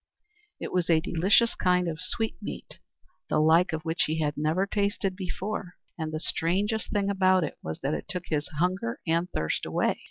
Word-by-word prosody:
It - - -5
was 180 -2 0
a 165 -2 +5
delicious 190 +7 +3
kind 180 -1 +2
of 165 0 -3
sweetmeat, 225 +4 -4 0.5
the - - +2
like 160 +4 +5
of 160 -1 -3
which 165 +1 +1
he 160 +1 -1
had 150 -2 0
never 155 +6 +1
tasted 200 -1 0
before; 190 0 -4 0.2
and 160 -2 -4
the 155 - -3
strangest 200 +8 0
thing 205 -2 0
about 185 -2 +4
it 150 - -5
was 80 - -5
that 140 +3 0
it - - -4
took 180 -1 -3
his 150 -1 0
hunger 190 - 0
and 170 +1 +1
thirst 80 - -1
away. - - 0
180 Hz, 185 wpm, -28 LUFS, 160-195 Hz, 0.5 s, a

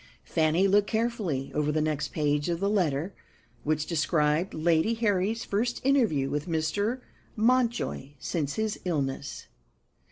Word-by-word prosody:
Fanny 165 +4 +2
looked 205 +1 +3
carefully 220 - -1
over 150 0 +1
the 155 - 0
next 150 -1 0
page 150 +1 0
of 170 -1 -1
the 200 +1 +1
letter, 175 -3 0 0.5
which 155 0 0
described 155 +1 +1
Lady 165 +7 +2
Harry's 220 0 0
first 235 +4 -1
interview 225 - +3
with 145 +3 -3
Mr. 200 +10 -1 0.3
Mountjoy 235 - +1
since 145 +1 -2
his 220 -1 -1
illness. 140 -5 -3
170 Hz, 130 wpm, -28 LUFS, 150-215 Hz, 0.5 s, looked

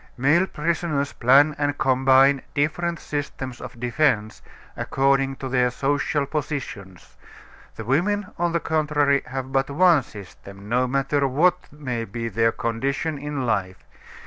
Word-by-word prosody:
Male 150 +9 +3
prisoners 155 -3 -2
plan 140 +5 +4
and 145 0 0
combine 135 +1 +4
different 165 +4 -1
systems 135 -4 -5
of 120 - -9
defense 120 -4 0 0.3
according 135 0 +1
to 135 - -6
their 125 -1 +2
social 140 +2 -1
positions; 130 - -6 0.6
the 110 - -7
women, 185 - 0
on 175 0 +1
the 170 - 0
contrary, 150 -3 +1
have 130 0 -5
but 135 0 0
one 165 +1 +4
system, 100 -2 -12
no 125 +3 +1
matter 140 +2 0
what 175 +7 +1
may 130 -6 -4
be 115 +2 -5
their 115 +2 +2
condition 135 +7 -2
in 145 -2 -4
life. 95 -5 -2
135 Hz, 135 wpm, -23 LUFS, 125-150 Hz, 0.6 s, plan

